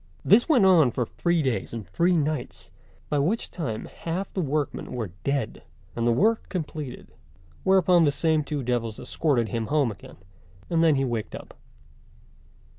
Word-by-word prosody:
This 225 - +5
went 250 -11 +5
on 170 -8 +6
for 120 +1 -2
three 170 +5 0
days 130 -4 -2
and 110 -3 -6
three 175 +1 +2
nights, 155 0 -3 0.4
by 145 - 0
which 185 +11 -1
time 120 - -4
half 175 +4 -5
the 190 - -1
workmen 150 -3 -2
were 115 -7 -4
dead, 140 -1 -2 0.3
and 115 0 0
the - - +4
work 220 - +2
completed; 155 -7 -6 0.5
whereupon 185 -2 +4
the 145 - +3
same 155 +1 +1
two 145 -2 -3
devils 115 -3 -2
escorted 125 -8 0
him 115 +1 -2
home 145 -5 +2
again, 100 - -13 0.5
and 165 -1 +3
then 160 -3 +5
he 135 0 +1
waked 115 -4 -3
up. - - -10
150 Hz, 165 wpm, -25 LUFS, 120-170 Hz, 0.5 s, on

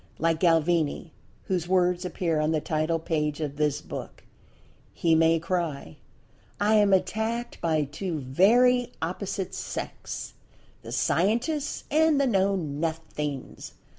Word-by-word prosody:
Like 165 -1 +1
Galvini, 165 -1 +2 0.3
(whose 180 -3 -2
words 180 0 +2
appear 170 -3 -1
on 155 0 +1
the 155 - +1
title 155 +2 0
page 150 -2 -2
of 145 -2 -4
this 150 -2 0
book) - - -8 0.7
he 165 -1 +1
may 165 +1 +4
cry: 165 - -3 0.6
"I 210 +2 +3
am 205 -2 +5
attacked 220 +6 -1
by 160 -2 +1
two 155 +4 -4
very 240 - +3
opposite 190 +3 -3
sects—the - - -8
scientists 250 - 0
and 310 -1 +4
the 280 - +3
know 200 -4 +2
nothings. 150 -3 -4
170 Hz, 120 wpm, -26 LUFS, 155-200 Hz, 0.7 s, am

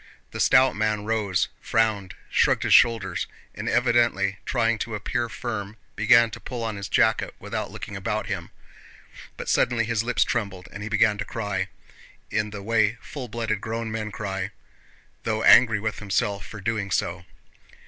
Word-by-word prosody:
The - - -7
stout 130 0 +5
man 105 -1 0
rose, 105 -4 0
frowned, 110 -4 0 0.2
shrugged - - +3
his - - +3
shoulders, 105 -7 +4 0.3
and - - -4
evidently 115 -5 +2
trying 115 -2 +1
to 110 -1 -3
appear 115 +3 -2
firm 110 -3 -5 0.2
began 115 +2 +5
to - - -8
pull 120 -2 -5
on 110 -1 -2
his 100 -2 -6
jacket - - +2
without - - -4
looking 100 - -8
about 105 +2 -2
him, 95 -4 -4 0.9
but - - -6
suddenly 120 -2 +2
his 115 -2 0
lips 120 +1 +2
trembled 95 -4 -3
and 100 - -8
he 105 - -4
began 110 -1 +3
to - - -1
cry, 100 -3 -3 0.6
in 105 - 0
the 100 -1 -8
way 110 +1 +2
full 135 -4 -7
blooded 110 -2 -2
grown 115 0 -3
up - - -6
men 110 -1 -3
cry, 95 -2 -3 0.7
though 110 -1 -1
angry 115 -3 +7
with 110 +1 -3
himself 100 0 -1
for 105 - -9
doing 100 0 -2
so. 85 -1 -1
110 Hz, 170 wpm, -25 LUFS, 100-115 Hz, 0.9 s, angry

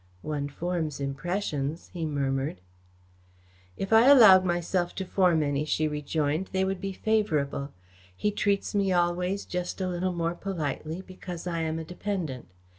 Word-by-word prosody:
"One 145 -2 -3
forms 160 -1 -3
impressions," 150 +1 -3
he 165 -3 -2
murmured. 135 - -1 1.2
"If 195 +3 -2
I 225 +3 +7
allowed 215 -10 +9
myself 175 0 -1
to 190 - -3
form 180 -4 +3
any," 145 0 0
she 155 0 0
rejoined, 150 +3 -1
"they 190 0 +2
would 190 -1 -2
be 195 - -3
favourable. 155 -10 0 0.4
He 210 - 0
treats 200 -1 0
me 200 -2 +2
always 180 +2 +1
just 180 +1 -4
a 185 - -1
little 180 +1 -1
more 170 0 -1
politely, 170 -2 -4
because 180 -2 -8
I 170 -2 -2
am 160 0 -1
a 165 - -4
dependent. 175 - -4
175 Hz, 150 wpm, -28 LUFS, 150-190 Hz, 1.2 s, allowed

